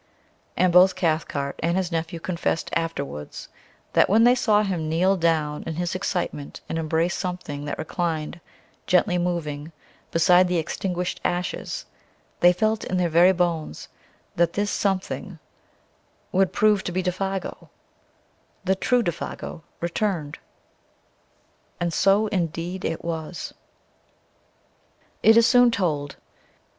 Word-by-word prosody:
And 180 -1 +3
both 180 +1 +7
Cathcart 155 -5 -1
and 170 +2 +1
his 185 -2 -1
nephew 165 +1 -3
confessed 170 -1 -2
afterwards 140 - -4 0.4
that - - +4
when 220 +4 +5
they 245 +1 +7
saw 215 -4 +3
him 175 -6 -2
kneel 180 +5 +3
down 160 -4 0
in 160 - -3
his 175 +1 -2
excitement 175 -6 -3
and 165 - -2
embrace 165 +2 0
something 175 -6 -4
that 145 - -4
reclined, 165 0 -3 0.5
gently 180 0 +3
moving, 165 -4 -3 0.4
beside 180 +2 +5
the 180 0 0
extinguished 180 +2 -3
ashes, 175 -1 -2 0.5
they 175 - +7
felt 215 +4 0
in 185 - -2
their 180 -1 +1
very 170 +3 +6
bones 170 - -2 0.5
that 170 0 +3
this 205 0 0
"something" 195 -2 -2 0.9
would 190 -1 +2
prove 210 -1 +3
to - - -2
be 185 +1 -1
Défago 190 +1 -3 1.0
the 190 - +3
true 245 +5 +1
Défago, 170 -1 -5 0.2
returned. 170 -4 -2 1.4
And 170 -1 -1
so, 195 +5 +4
indeed, 175 -2 -2
it 165 0 -3
was. 165 +1 -5 1.7
It 225 +1 +6
is 230 - +7
soon 245 0 +6
told. 155 -10 -1
175 Hz, 125 wpm, -24 LUFS, 165-190 Hz, 1.7 s, both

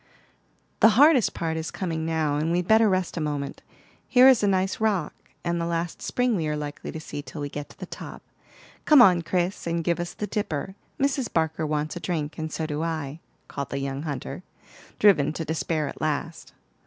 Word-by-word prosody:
"The 220 0 +6
hardest 285 -4 +5
part 160 -2 -2
is 160 0 -3
coming 165 -4 -3
now, 155 -3 0
and 155 +3 0
we'd 175 0 0
better 220 0 +5
rest 185 -2 -1
a - - -1
moment. 145 -2 -3 0.5
Here's 255 -1 +6
a 205 - +2
nice 190 0 +1
rock, 205 -8 0 0.3
and 170 -1 -1
the - - -1
last 170 0 -3
spring 250 -2 0
we 160 -5 -1
are 150 - -1
likely 145 -1 -6
to 160 - -6
see 150 -2 -6
till 150 - -9
we 145 0 -3
get 145 0 -6
to - - -17
the - - -6
top. - - -9 0.6
Come 300 -2 +7
on, 185 -7 +7
Chris, 175 +2 -1
and 170 0 -1
give 170 +1 0
us 175 0 -4
the 210 - -3
dipper. 190 -5 -3 0.3
Mrs. 270 -2 0
Barker 160 -1 0
wants 150 +1 -2
a - - -4
drink, 155 -3 -3
and 160 0 -4
so 160 - -3
do 150 0 -3
I," 160 -3 -3 0.3
called 140 -1 -5
the 140 - -3
young 135 0 -3
hunter, 145 -1 -5 0.6
driven 155 -8 +4
to 165 - -4
despair 160 -1 -1
at - - -8
last. 155 +2 -3
165 Hz, 205 wpm, -25 LUFS, 150-190 Hz, 0.6 s, Come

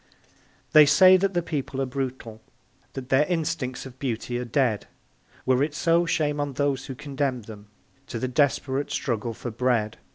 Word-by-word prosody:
They 150 -1 +8
say 185 +5 +7
that 195 0 -1
the 175 - +1
people 140 -4 -4
are 135 - +1
brutal 125 -4 -5 0.5
That 130 -1 -7
their 135 +3 +4
instincts 160 -7 -2
of 130 -1 -12
beauty 120 -1 -3
are 125 - -4
dead 120 -3 0 0.6
Were 130 0 +3
it 145 +1 -1
so, 170 +1 +2
shame 150 -2 0
on 145 -1 -2
those 140 -1 -1
who 135 - -6
condemn 135 -3 -3
them 105 -1 -11 0.4
To - - -5
the 130 - -2
desperate 135 0 0
struggle 115 -2 -2
for 120 - -6
bread. 115 -2 0
135 Hz, 170 wpm, -25 LUFS, 125-150 Hz, 0.6 s, They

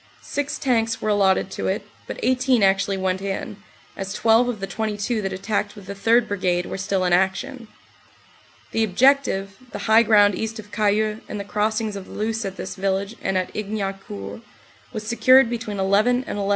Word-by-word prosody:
Six 285 0 -3
tanks 230 -4 0
were 215 - -2
allotted 195 -2 +2
to - - -3
it, - - -2 0.2
but - - -6
18 255 -3 +2
actually 195 0 +2
went 190 0 -1
in, 195 +1 -4 0.4
as 195 0 -5
12 230 +2 +4
of 230 -4 -4
the 195 - -3
22 215 +2 -2
that 195 -1 -3
attacked 205 +2 -2
with 200 -2 -12
the 200 - -6
3rd 230 +4 +3
Brigade 180 -3 0
were - - -5
still 195 -1 0
in 180 - +2
action. 225 +7 0 1.0
The 225 - +1
objective, 210 -3 +2
the - - -6
high 220 +1 +6
ground 205 -2 +5
east 220 +3 -4
of 210 -1 -10
Cayeux 215 +1 +1
and 210 - -4
the - - -3
cross 210 +2 0
ings 220 -2 -3
of 195 -1 -7
the - - -11
Luce 220 +1 -2
at 195 0 -5
this 185 - -5
village 195 +2 -2
and 190 - 0
at 185 - -2
Ignaucourt, 195 - -5 0.5
was 215 -1 -6
secured 240 +2 +5
between 230 -3 -4
11 210 +6 +2
and 205 - -5
11.30a. 200 0 -1
205 Hz, 190 wpm, -23 LUFS, 195-225 Hz, 1.0 s, high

